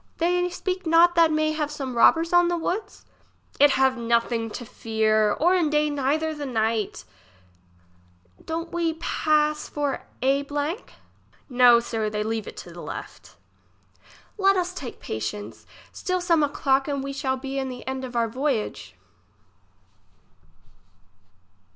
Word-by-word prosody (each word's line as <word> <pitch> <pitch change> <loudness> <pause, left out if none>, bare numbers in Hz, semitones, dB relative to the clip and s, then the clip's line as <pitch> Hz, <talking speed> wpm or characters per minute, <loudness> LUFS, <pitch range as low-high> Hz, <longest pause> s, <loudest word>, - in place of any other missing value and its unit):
They 355 +1 +1
speak 365 0 -4
not 335 +2 +6
that 335 -2 +4
may 310 0 +1
have 305 -1 -2
some 270 -4 -5
robbers 325 +8 +4
on 350 0 +5
the 345 0 0
woods? 390 +5 -4 0.5
It 290 - +7
have 265 -1 +2
nothing 235 0 0
to 240 - -7
fear, 215 -1 +1
or 350 +4 +2
in 345 -5 +2
day 300 0 +1
neither 290 +3 0
the 295 -2 -5
night. 220 -3 -1 1.4
Don't 330 +1 -4
we 335 -1 0
does - - -18
pass 305 -2 +1
for 290 -2 -3 0.2
a? 285 +4 0 0.7
No, 245 -2 +6
sir, 225 -2 -2
they 210 0 -2
leave 220 0 -3
it - - -9
to - - -9
left. - - -9 1.0
Let 390 0 +4
us 365 0 -1
take 265 -9 -8
patience, 205 - -6 0.2
still 365 -1 -2
some 340 -3 +2
o'clock, 275 -2 +1
and 280 -2 -2
we 275 0 -4
shall 265 -1 -1
be 270 +1 -4
in 265 -1 -3
the 250 -1 -8
end 265 0 -3
of 250 -1 -7
our 230 -1 +2
voyage. 220 - -3
280 Hz, 145 wpm, -24 LUFS, 240-325 Hz, 1.4 s, It